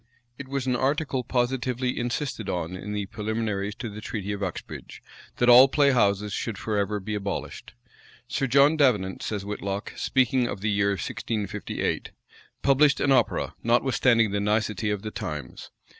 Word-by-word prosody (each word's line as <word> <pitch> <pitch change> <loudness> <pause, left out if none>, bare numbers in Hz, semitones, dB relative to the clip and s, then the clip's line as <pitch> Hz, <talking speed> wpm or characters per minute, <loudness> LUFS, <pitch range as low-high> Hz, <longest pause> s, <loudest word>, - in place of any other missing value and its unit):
It 140 - -7
was 135 -1 -2
an 125 -1 +1
article 135 0 0
positively 125 0 -1
insisted 120 -3 -3
on 90 -1 -3
in 105 +3 -6
the 105 -1 -2
preliminaries 105 -1 -3
to 120 - -6
the 105 0 -8
treaty 105 -2 -4
of 100 0 -4
Uxbridge, 95 -3 -6 0.4
that 120 - +2
all 125 +2 +9
play 140 0 +3
houses 105 -4 +2
should 115 +3 -3
forever 105 -1 -1
be 105 +2 -5
abolished. 100 -10 -5 0.5
Sir 135 - -1
John 140 +4 +5
Davenant, 105 -11 +2
says 105 -2 -3
Whitlocke,[] 100 0 -4
speaking 130 -1 +2
of 100 - -5
the 105 +1 0
year 100 0 +2
1658, 105 +3 -3 0.5
published 140 +1 +4
an 140 - +2
opera, 125 -4 +2
notwithstanding 120 -2 +3
the 100 - 0
nicety 105 0 0
of 105 -1 -2
the 110 - -5
times. 75 -9 -6
110 Hz, 160 wpm, -26 LUFS, 100-130 Hz, 0.5 s, all